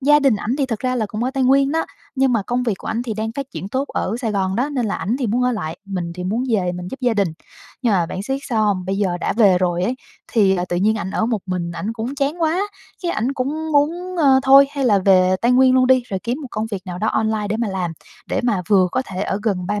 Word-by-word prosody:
Gia 295 +2 +5
đình 270 -6 +3
ảnh 235 +6 -2
thì 275 - +1
thật 225 -4 -3
ra 255 -1 0
là 220 -3 0
cũng 215 +4 -3
ở 260 - 0
Tây 270 -1 -1
Nguyên 275 +2 +4
đó, 325 - +1 0.3
nhưng 265 -1 +2
mà 220 -4 +1
công 245 +4 -1
việc 225 -5 0
của - - -10
ảnh 230 +2 -1
thì 225 -3 -4
đang 220 +1 -3
phát 275 +2 -4
triển 190 - -6
tốt 265 +6 -2
ở 210 - -2
Sài 225 -3 -1
Gòn 190 -1 0
đó, 255 +4 +1
nên 255 -6 -1
là 205 - -1
ảnh 225 +6 -1
thì 255 - -1
muốn 240 +4 +1
ở 250 0 +2
lại, 160 -7 -4
mình 180 -4 -4
thì 180 0 -6
muốn 225 +7 -1
về 185 -6 +1
mình 180 0 -6
giúp 265 - -7
gia 245 -3 +1
đình. 200 -4 +2 0.5
Nhưng 235 -4 +2
mà 175 -3 +2
bạn 190 - -5
siết 270 +5 -2
sao 220 -3 +1
hông? 195 -3 0
Bây 195 +1 -2
giờ 185 -4 0
đã - - 0
về 200 -5 +4
rồi 175 -1 0
ấy 245 - 0 0.4
thì, 195 -5 +4
à, 180 - -1
tự 175 - -1
nhiên 215 +4 +2
ảnh 190 - -4
ở 220 - 0
một 230 -3 0
mình 175 -2 -3
ảnh 205 +6 -4
cũng 235 +4 -4
chán 285 +5 -1
quá, 325 +4 +2 0.4
cái 345 - 0
ảnh 240 +5 -1
cũng 300 +4 -3
muốn, 345 +6 +1
ờ, 270 -4 +5
thôi, 275 +1 +7
hay 280 -2 -2
là 205 -5 +4
về 185 -1 +4
Tây 240 - +3
Nguyên 260 0 +5
luôn 255 -1 +4
đi 255 -1 +4
rồi 190 -2 -2
kiếm 245 +5 -2
một 270 - -7
công 220 0 -2
việc 195 -3 -4
nào 180 0 -5
đó 220 - 0
online 220 -1 0
để 215 - -1
mà 230 -2 -1
làm, 185 -3 -2 0.3
để - - -1
mà 210 -7 +1
vừa 190 -3 +4
có 255 - +1
thể 190 +1 -4
ở 195 - -1
gần 190 -5 -1
ba 205 +1 -1
225 Hz, 295 wpm, -20 LUFS, 195-260 Hz, 0.5 s, thôi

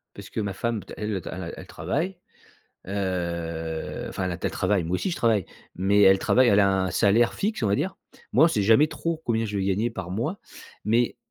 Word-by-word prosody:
parce - - -10
que - - -3
ma 100 -1 -2
femme 115 +2 -2 0.2
elle 105 -2 -2
elle 95 - -5
a 85 - -5
elle - - -9
travaille, 155 - -3 0.7
heu, 85 -4 -3
enfin 95 - -4
elle 90 - -1
a 85 - -4
tel - - -2
travail, 100 -4 +1
moi 85 +3 0
aussi 185 - -2
je - - -2
travaille. 110 -6 +2 0.3
Mais 100 +3 +3
elle 95 -1 +7
travaille, 130 +5 +4
elle 100 - +5
a 100 - +4
un 95 - -2
salaire 110 +5 +3
fixe, 210 -3 -2
on - - +3
va 100 - +2
dire. - - -2 0.4
Moi 135 +8 +7
on - - +6
sait 110 -11 0
jamais 115 +9 +5
trop 165 0 -3
combien 115 -1 +1
je 105 -1 -3
vais 95 - 0
gagner 100 +5 +1
par 95 -6 -6
mois, 150 - -2 0.5
mais, 115 +3 +2
100 Hz, 225 wpm, -25 LUFS, 95-115 Hz, 0.7 s, elle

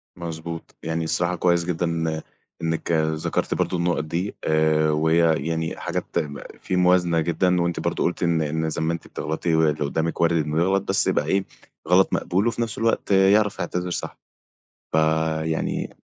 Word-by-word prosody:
مضبوط، 85 -1 -7
يعني 80 0 -2
الصراحة 85 +2 0
كويس 85 0 +2
جدًا 90 0 -1
إن 80 -1 -1 0.4
إنك 80 0 -2
ذكرتِ 80 -1 0
برضو 90 - 0
النقط 85 -2 0
دي 85 +6 -3
آآ، 80 0 +2
وهي 80 0 +2
يعني 80 0 -2
حاجات - - -3
تم 70 -1 -2 0.2
فيه - - -3
موازنة 90 -2 +3
جدًا 85 +2 +1
وأنتِ 85 -1 -1
برضو - - -1
قُلتِ 90 - -1
إن 85 -1 +2
إن 80 +1 -1
زي 75 - -3
ما 80 +1 +1
أنتِ 85 - -7
بتغلطي 80 +2 -2
واللي 75 -2 +2
قدامِك 80 +3 -2
وارد 85 -2 +2
إنه 75 +1 -2
يغلط 95 +2 +2
بس - - +2
يبقى - - +1
إيه؟ 95 0 +1 0.4
غلط 90 +2 +4
مقبول 95 +6 +1
وفي 120 0 -1
نفس 115 -2 -3
الوقت 115 -2 0
آآ، 95 0 +5
يعرف 105 -1 +3
يعتذر 90 0 -2
صح 90 - -4 0.7
فيعني 80 0 0
85 Hz, 170 wpm, -23 LUFS, 80-90 Hz, 0.7 s, آآ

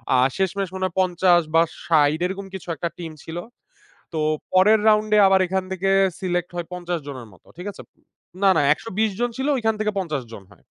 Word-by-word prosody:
আ - - +4 0.2
শেষমেষ 195 0 -1
মনে 185 0 -2
হয় 180 - -4
৫০ 180 -1 +3
বা 165 - +7 0.2
৬০ 155 -1 +3
এরকম 195 +2 -4
কিছু 190 -2 -8
একটা 170 +1 -3
টিম 165 -2 -6
ছিল। 165 +1 -6 0.8
তো 155 - -1 0.3
পরের 210 +4 +5
রাউন্ডে 215 0 +3
আবার 190 0 +4
এখান 190 +1 -1
থেকে 190 +1 -1 0.3
সিলেক্ট 175 -2 -2
হয় 170 -1 -4
৫০ 175 -1 -3
জনের 130 -5 -7
মতো। 90 - -23
ঠিক 180 +3 -7
আছে? - - -12 0.6
না, 195 - +6
না, - - +4
১২০ 220 +3 -2
জন 240 0 +1
ছিল 265 - -2
ওইখান 225 -2 0
থেকে 215 0 0
৫০ 150 -8 -3
জন 100 - -10
হয়। 95 - -18
185 Hz, 195 wpm, -22 LUFS, 165-195 Hz, 0.8 s, বা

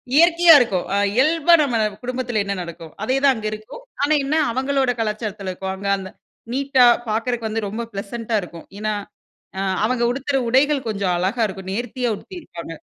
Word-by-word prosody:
இயற்கையா 340 +1 +7
இருக்கும். 200 -8 0
அ - - +2 0.2
இயல்பா 310 +7 +3
நம்ம 250 -5 +1 0.3
குடும்பத்தில 245 -3 -2
என்ன 200 0 -2
நடக்கும், 170 -2 -9
அதே 260 +5 +1
தான் 275 - +6
அங்க 220 - -7
இருக்கும். 215 - -9 0.2
ஆனா 295 +2 +3
என்ன 300 +3 0 0.2
அவங்களோட 265 +1 +1
கலாச்சாரத்துல 210 -3 -3
இருக்கும். 190 +1 -5
அங்க 200 +1 -6
அந்த 190 -1 -7 0.4
நீட்டா 270 -1 +4 0.2
பார்க்கறதுக்கு 230 +1 -1
வந்து 220 0 -2
ரொம்ப 220 +4 -4
ப்ளசண்ட்டா 220 +3 -3
இருக்கும். 170 -2 -10
ஏனா, 215 0 -1 0.6
அ - - -2 0.3
அவங்க 240 0 0
உடுத்துற 275 +1 -1
உடைகள் 270 0 +2
கொஞ்சம் 200 -4 -1
அழகா 200 +6 0
இருக்கும் 190 -1 -8
நேர்த்தியா 245 +2 -2
உடுத்தியிருப்பாங்க. 200 - -9
230 Hz, 165 wpm, -21 LUFS, 200-270 Hz, 0.6 s, இயற்கையா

